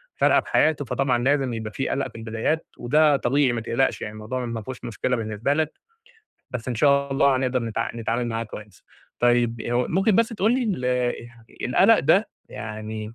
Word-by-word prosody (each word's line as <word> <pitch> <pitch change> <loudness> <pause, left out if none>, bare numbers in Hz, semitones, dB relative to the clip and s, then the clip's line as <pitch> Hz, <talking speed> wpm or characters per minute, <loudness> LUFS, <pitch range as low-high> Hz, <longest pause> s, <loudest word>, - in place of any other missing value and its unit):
فارقة - - +4
في - - -13
حياته، 155 -2 +2
فطبعًا 125 -1 0
لازم 135 -2 +1
يبقى 110 -1 -5
في 120 +6 -3
قلق 140 - -1
في - - -26
البدايات، 115 +8 -2
وده 145 +4 +3
طبيعي 135 +1 +2
ما 115 - -2
تقلقش 120 +3 0
يعني 105 - -5
الموضوع 115 +4 -4
ما 115 -1 -4
فيهوش 125 +2 -8
مشكلة 125 +2 -1
بالنسبة 110 +3 -1
لك، 155 0 0 0.8
بس 125 0 -5
إن 120 - -1
شاء 140 +2 +3
الله 135 -1 +3
هنقدر 130 -1 0
نتع 115 -2 -2
نتعامل 115 +1 -1
معاه 115 0 -2
كويس، 105 -2 -11 0.4
طيب 120 -1 +2
هو 120 +1 +1
ممكن 195 +3 +2
بس 230 0 +3
تقولي 230 +3 +1
ال 190 - -2 0.8
القلق 200 - +5
ده 185 +9 +3 0.2
يعني 110 0 -6
125 Hz, 180 wpm, -24 LUFS, 115-145 Hz, 0.8 s, القلق